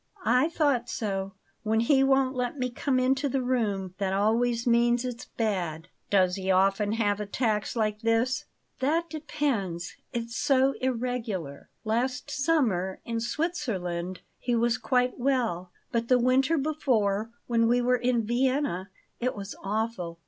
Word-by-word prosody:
"I 250 +6 +4
thought 285 -7 +1
so. 195 -3 -3 0.3
When 220 0 +1
he 270 +3 +4
won't 270 -1 +3
let 250 +2 -2
me 250 -2 -1
come 260 +1 0
into 265 +2 +1
the 265 0 0
room, 205 -7 -1
that 190 -1 0
always 230 +4 +1
means 240 +1 +3
it's 245 -2 -5
bad." 180 -7 -2 0.2
"Does 185 -2 +3
he 190 0 -3
often 195 +2 +3
have 205 -3 +1
attacks 210 +1 -1
like 215 -2 0
this?" 230 +3 +1 0.3
"That 325 +6 0
depends 260 - -2 0.2
It's 230 -1 -4
so 270 +1 +3
irregular. 230 - -3
Last 250 +5 -1
summer, 260 - +1
in 230 -1 -2
Switzerland, 220 - -2 0.2
he 240 -1 0
was 235 +1 +2
quite 250 -1 +1
well; 235 -9 0 0.2
but 230 0 0
the 255 - +5
winter 260 +6 +3
before, 230 -8 0 0.2
when 230 -1 +2
we 240 +1 +3
were 250 +1 +2
in 240 -2 +1
Vienna, 250 -5 0 0.3
it 250 +1 -1
was 200 -1 -6
awful. 200 -4 -2
235 Hz, 145 wpm, -27 LUFS, 205-255 Hz, 0.3 s, the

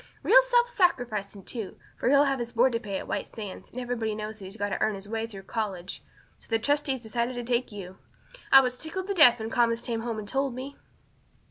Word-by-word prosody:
Real - - +7
self - - +3
sacrificing, 235 - 0
too, 220 -1 -6 0.2
for - - 0
he'll 280 +1 +6
have 275 -2 0
his 240 0 -4
board 245 +3 +4
to 230 - -1
pay 200 -3 -4
at - - -7
White - - -2
Sands, 205 -4 -8
and 250 - -7
everybody 235 -3 -2
knows 215 +1 -6
he's 195 +2 -9
got 205 -1 -1
to - - -3
earn 215 -1 +2
his 195 0 -9
own 210 - -9
way 225 0 -1
through 195 -4 -10
college. 195 -4 -4 0.4
So - - -17
the 225 - +3
trustees 280 +1 0
decided 235 +2 -2
to 245 - -4
take 240 0 0
you. 190 -2 -9 0.5
I 270 - +10
was 250 -1 -2
tickled 350 +4 -4
to - - +1
death 275 -10 +7
when 220 0 -5
Thomas 235 -1 +2
came 230 -2 -2
home 230 -1 -3
and 210 -1 -6
told 270 +1 -1
me." 270 +2 -7
235 Hz, 235 wpm, -27 LUFS, 215-265 Hz, 0.5 s, I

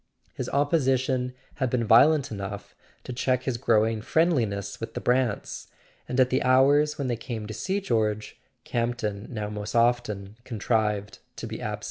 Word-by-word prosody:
His - - -4
opposition 130 -3 +1 0.3
had 130 -3 0
been 120 -1 0
violent 140 +6 +5
enough 100 0 -6 0.3
to 125 - -6
check 130 0 0
his 130 -3 -1
growing 110 -2 +2
friendliness 120 - 0
with 115 0 -6
the - - -1
Brants; 125 -4 0 0.4
and 125 - -1
at 130 -1 +4
the 130 - +2
hours 145 +4 +4
when 140 - -2
they 120 - 0
came 115 -2 -6
to 110 - -6
see 190 - -1
George, 110 - -1 0.2
Campton 115 -3 -2
now 105 -4 -4
most 105 +1 -5
often 110 -4 +1
contrived 105 -3 -1 0.2
to - - -6
be - - -6
absent. - - -3
120 Hz, 160 wpm, -26 LUFS, 110-130 Hz, 0.4 s, violent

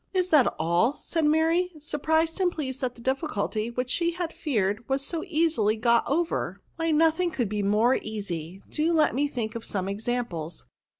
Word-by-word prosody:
Is 365 -1 +2
that 295 -6 +5
all? 170 - +2
" - - -21
said 325 -2 -2
Mary, 325 +4 +3
surprised 320 +3 0
and 360 -1 +3
pleased 265 -5 -5
that 250 -2 -2
the 235 - -14
difficulty, 235 -5 -1
which 250 +1 -3
she 340 +3 +1
had 345 -1 -3
feared, 215 -5 -1
was 270 +1 0
so 330 +1 -3
easily 310 - +2
got 235 +1 +3
over; 330 +6 -1
" - - -39
why 330 0 0
no 320 +1 +5
thing 355 +2 -1
can 250 -8 -1
be 210 +1 -2
more 210 +5 +3
easy; 190 -4 -5
do 315 +2 0
let 310 -2 +3
me 285 +4 +1
think 230 -6 -4
of 230 -2 -6
some 190 -2 -2
examples. 200 -6 -3
260 Hz, 195 wpm, -26 LUFS, 215-320 Hz, -, that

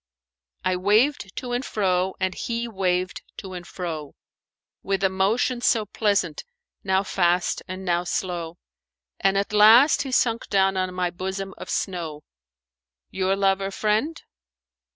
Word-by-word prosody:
'I 185 0 +1
waved 210 +3 +2
to 250 - -5
and 245 +1 -1
fro 190 -5 0
and 185 -1 0
he 235 +3 -3
waved 185 -3 -1 0.2
to 190 -2 -8
and 175 -1 -8
fro, 160 -5 -6 0.3
* - - -69
With 195 -1 -1
a 190 - +4
motion 220 +6 +1
so 225 -3 +2
pleasant, 200 -6 0 0.4
now 190 0 +2
fast 175 -2 +1
and 185 +1 -6
now 175 0 +1
slow; 175 -1 -3 0.6
And 195 0 +2
at 200 +1 -1
last 225 +8 +7
he 270 - -4
sunk 230 -2 +1
down 195 -1 +3
on 185 -1 -1
my 180 -1 0
bosom 190 +2 -5
of - - -10
snow; 165 -6 -3 0.4
* 65 0 -61
'Your 190 0 0
lover 195 0 +1
friend?'" 215 +11 -1
190 Hz, 150 wpm, -24 LUFS, 180-210 Hz, 0.6 s, last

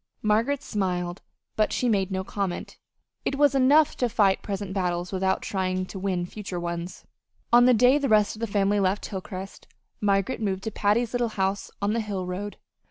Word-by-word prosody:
Margaret 230 +7 +1
smiled, 180 -5 -2 0.3
but 215 -1 +2
she 250 - 0
made 195 -4 +1
no 190 -1 -2
comment 190 -2 -4 0.4
it - - -1
was 285 -1 +4
enough 275 +3 +4
to 245 - +1
fight 205 -4 +3
present 200 -1 -4
battles 180 -2 -1
without 190 0 0
trying 185 -1 -1
to 190 - -8
win 185 -2 -1
future 190 -1 -6
ones. 170 +1 -5 0.5
On 240 0 +8
the 250 - +6
day 250 +5 +5
the 280 - -1
rest 210 -1 +3
of - - -12
the 230 - -2
family 205 0 +1
left 195 +1 0
Hilcrest, 190 0 -7 0.3
Margaret 200 +4 +1
moved 195 -2 -1
to 220 - -3
Patty's 215 +4 +1
little 240 -1 +1
house 195 -1 -1
on 205 +1 +1
the 230 - 0
Hill 200 -4 -4
road. 195 +3 -5
200 Hz, 185 wpm, -26 LUFS, 190-225 Hz, 0.5 s, On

